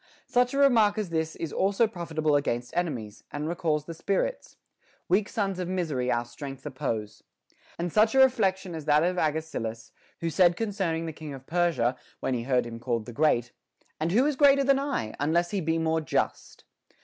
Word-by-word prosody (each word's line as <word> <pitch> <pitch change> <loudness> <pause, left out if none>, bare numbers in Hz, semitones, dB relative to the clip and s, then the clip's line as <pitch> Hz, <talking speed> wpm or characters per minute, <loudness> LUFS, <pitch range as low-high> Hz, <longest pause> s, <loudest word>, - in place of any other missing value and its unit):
Such 245 +2 +1
a - - 0
remark 230 -7 +4
as 205 -5 -3
this 160 -1 -1
is 165 - -5
also 200 +4 +2
profitable 160 -7 -1
against 120 -4 -1
enemies, 120 -12 -3
and 150 +1 -3
recalls 160 -3 -1
the 165 - -6
spirits: 200 - -2 0.5
Weak 200 +3 +2
sons 195 -3 -2
of 180 - -2
misery 155 -9 -1
our 120 0 0
strength 135 +3 -9
oppose.t 115 -7 -4 0.5
And 170 0 -3
such 220 +3 +4
a - - +5
reflection 195 -8 +3
as 160 -2 -6
that 150 +1 +4
of 180 +1 0
Agesilaus, 150 -8 -2 0.3
who 165 0 -2
said 175 +2 +4
concerning 190 -7 -1
the 160 - -5
king 150 -2 -8
of 135 0 -12
Persia, 160 -8 +1 0.2
when 130 - -1
he 120 - -1
heard 125 0 +1
him 115 -1 -7
called 115 -2 -2
the 120 - -8
Great: 120 -4 +2 0.5
And 160 +2 0
who 240 +8 +4
is 300 -1 +1
greater 280 0 +5
than 275 0 +3
I, 275 - -2
unless 170 +4 +1
he 200 - -1
be 160 0 0
more 160 0 +1
just? 155 - -2
165 Hz, 190 wpm, -27 LUFS, 135-195 Hz, 0.5 s, a